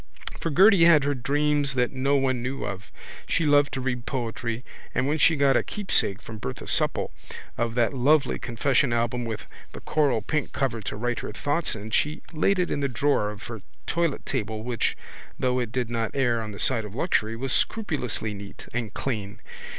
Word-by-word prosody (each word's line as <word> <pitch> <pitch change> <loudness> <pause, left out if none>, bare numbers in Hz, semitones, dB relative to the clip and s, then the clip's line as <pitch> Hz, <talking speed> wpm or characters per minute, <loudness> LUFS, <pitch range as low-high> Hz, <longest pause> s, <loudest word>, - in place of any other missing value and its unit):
For 165 - -2
Gerty 185 +2 +6
had 160 -4 +7
her 145 +1 +1
dreams 145 +1 +1
that 125 -1 +1
no 135 +2 +1
one 130 -3 +1
knew 130 +2 -3
of. 100 +1 -5 0.4
She 165 - +1
loved 145 -1 +4
to 135 - -2
read 125 -2 -3
poetry 115 -1 -3 0.3
and 130 - +1
when 155 +2 0
she 160 +3 +5
got 140 -2 +4
a - - +4
keepsake 150 - -1
from 110 -1 -8
Bertha 65 - -6
Supple - - +3 0.4
of 115 0 -1
that 120 +2 +2
lovely 140 +1 +3
confession 125 +2 +1
album 120 +1 0
with 115 -2 -5 0.3
the - - -7
coralpink 145 -1 0
cover 120 -5 -1
to - - -4
write 120 +3 -1
her - - -5
thoughts 145 +6 -1
in 110 +1 -7
she 150 +7 0
laid 185 +5 +2
it 180 -1 0
in - - 0
the 140 - +1
drawer 130 -4 +1
of 105 -1 -8
her 115 -3 -7 0.2
toilettable 130 -10 -1
which, 120 -1 -1 0.4
though 125 0 +1
it 120 -3 -2
did 120 -1 -2
not 115 0 -2
err 120 -4 +2
on 110 -1 -5
the 100 - -8
side 120 -4 +2
of 105 0 -8
luxury, 115 -7 +1
was 130 +2 -2
scrupulously 140 - -1
neat 100 0 -9
and 115 -3 -3
clean. 105 -5 -3
125 Hz, 190 wpm, -26 LUFS, 115-145 Hz, 0.4 s, had